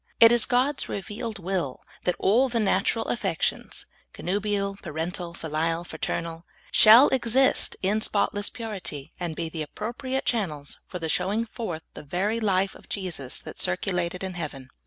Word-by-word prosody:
It 230 0 +9
is 240 -1 +3
God's 260 +3 +2
revealed 215 +3 -4
will 180 -7 -2 0.2
that 180 - +2
all 245 +7 +4
the 235 -1 0
natural 215 +2 +2
affec 195 -8 -1
tions - - -1
— - - -38
connubial, 200 +1 -1
parental, 170 +2 -4
filial, 165 +2 -1
fraternal 165 0 -3 0.2
— - - -27
shall 225 +6 +10
exist 260 +1 +3
in 205 +3 +2
spotless 205 -1 0
purity, 195 - -6
and 170 -3 -3
be 165 0 -2
the 160 0 -5
appropriate 240 - -3
channels 155 - -1
for 170 -3 -4
showing 195 +7 +1
forth 200 -8 -5
the - - -8
very 190 +9 -1
life 195 -3 +2
of - - -16
Jesus 175 -10 -3
that - - -9
circulated 175 - 0
in 190 -1 -3
heaven. 145 -6 -6
190 Hz, 155 wpm, -26 LUFS, 165-220 Hz, 0.2 s, shall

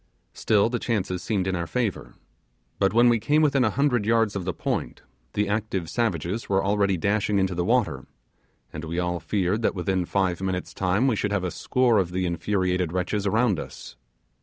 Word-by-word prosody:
Still 105 -1 +2
the 120 +1 -2
chances 95 -6 -2
seemed 100 -4 -1
in 95 0 -1
our 85 -1 -3
favour, 120 -3 -3 0.6
but 95 -1 +3
when 120 +2 +5
we 120 -1 +4
came 150 +8 +2
within 140 -3 +3
a 110 - +3
hundred 125 -1 +1
yards 115 -1 +2
of 95 -3 -3
the 90 - 0
point, - - -3 0.3
the 105 0 0
active 100 -5 -2
savages 105 -2 -2
were 95 0 +2
already 100 -1 +2
dashing 100 +3 +1
into 95 -1 +1
the 90 0 -1
water, 120 +3 0 0.7
and 80 - -6
we 85 +1 -4
all 90 -1 -1
feared 95 +5 -1
that 110 - 0
within 90 0 -1
five 95 -1 0
minutes' 95 -1 -3
time 95 +6 +1
we 130 -4 +2
should 100 0 -1
have 100 -2 0
a 90 - -2
score 125 -5 +2
of 90 -2 -1
the 90 0 0
infuriated 90 0 0
wretches 95 +3 -1
around 110 -2 +2
us. - - -9
100 Hz, 195 wpm, -25 LUFS, 90-110 Hz, 0.7 s, when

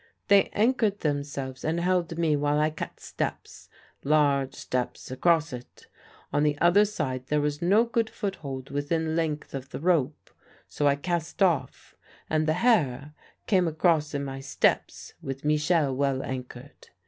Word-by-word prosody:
"They 200 -1 +6
anchored 220 -2 +1
themselves 140 -3 -3
and 160 +2 0
held 175 -2 0
me 165 -3 +2
while 145 0 +1
I 155 +1 +2
cut - - -7
steps - - -5 0.3
large 140 -2 +2
steps 125 0 -4
across 160 +2 +2
it. 125 0 -10 0.5
On 145 - +2
the 150 -1 +2
other 175 +6 +5
side 130 -11 -3
there 150 +1 +1
was 145 0 -1
no 200 +6 +4
good 230 -1 -1
foothold 140 -10 -5
within 160 +3 -1
length 155 -3 -2
of 135 -1 -6
the - - -6
rope, 155 -4 0 0.4
so 145 - 0
I 140 - +4
cast 170 +4 -2
off, 155 -9 0 0.4
and 155 0 +1
the 155 - +3
Herr 150 - +2 0.3
came 185 -4 +3
across 155 -2 +1
in 140 0 -2
my 135 0 -6
steps 135 - -1
with 135 +1 -6
Michel 150 -2 +2
well 135 -1 0
anchored. 130 +1 -8
150 Hz, 155 wpm, -27 LUFS, 140-170 Hz, 0.5 s, They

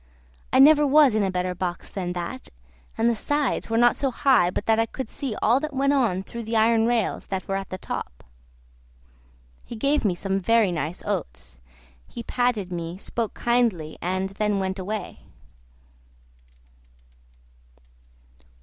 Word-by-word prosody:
I - - +3
never 295 +2 +7
was 285 -3 +5
in 215 - +1
a 195 - +1
better 180 0 -2
box 180 0 -4
than 180 -3 -4
that, 170 -7 -6 0.5
and 225 - +2
the 235 - +3
sides 290 +4 -1
were 225 - +1
not 240 +1 +5
so 275 - 0
high 250 -8 +3
but 195 - -4
that 225 0 +3
I 225 - +2
could 265 +1 -6
see 250 -1 -5
all 235 +4 +4
that 305 -1 -5
went 275 +1 +2
on 225 -9 +1
through 235 +4 -7
the 225 0 -4
iron 225 0 +3
rails 235 -3 -1
that 190 -2 -4
were 195 - -1
at 195 -1 -4
the 185 - -5
top. - - -6 1.4
He 235 - -9
gave 280 +6 +1
me 195 -5 +1
some 195 +2 -2
very 220 +1 +3
nice 165 0 -4
oats, - - -5 0.5
he 235 - -8
patted 235 -8 -1
me, 170 0 -5
spoke 225 +2 -4
kindly, 230 -10 0
and 185 +2 -1
then 205 +1 -1
went 190 0 -2
away. 205 +1 -5
215 Hz, 160 wpm, -24 LUFS, 185-240 Hz, 1.4 s, never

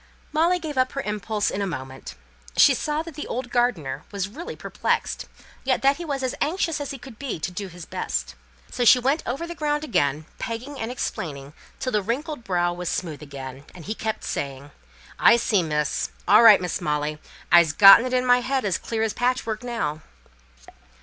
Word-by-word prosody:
Molly 335 +4 +3
gave 310 -6 -4
up 255 0 +1
her 275 - -2
impulse 210 -1 -2
in 200 - -3
a 200 - -1
moment. 135 -6 -7 0.4
She - - +7
saw 300 +1 -2
that 330 -1 -9
the 300 - -6
old 245 0 -4
gardener 165 - 0
was 200 -2 -2
really 300 +12 -8
perplexed, - - -2 0.4
yet 260 0 0
that 275 +1 +4
he 345 - -6
was 280 -3 -3
as 255 - -1
anxious 330 -1 0
as 285 - -4
he 275 - -5
could 245 -2 -13
be 270 - -4
to 180 - -3
do 195 +2 -5
his 175 -2 -10
best. - - -3 0.4
So 245 - -1
she 240 - +8
went 270 +6 +1
over 270 +8 -2
the 340 - -6
ground 295 -2 -1
again, 155 - 0
pegging 250 +4 -5
and 225 - -3
explaining 145 - -5 0.3
till 255 - -2
the 210 - +1
wrinkled 255 - -3
brow 175 -3 0
was 175 0 -4
smooth 160 -5 -3
again, 135 -2 -8
and 175 - -11
he 215 - -2
kept 220 0 -4
saying, 140 0 -4 0.5
"I 235 - +7
see, 215 -4 +2
miss. 150 -2 -1 0.2
All 210 - +7
right, 220 -3 +9
Miss 180 -1 -3
Molly, 150 0 -1 0.3
I'se 170 -2 +7
gotten 200 +7 +9
it 255 - -4
in 255 0 +1
my 245 0 +5
head 260 -1 -1
as 190 -4 0
clear 225 -1 -2
as 220 - 0
patchwork 245 -3 -1
now." 160 -11 -3
220 Hz, 200 wpm, -24 LUFS, 165-265 Hz, 0.5 s, right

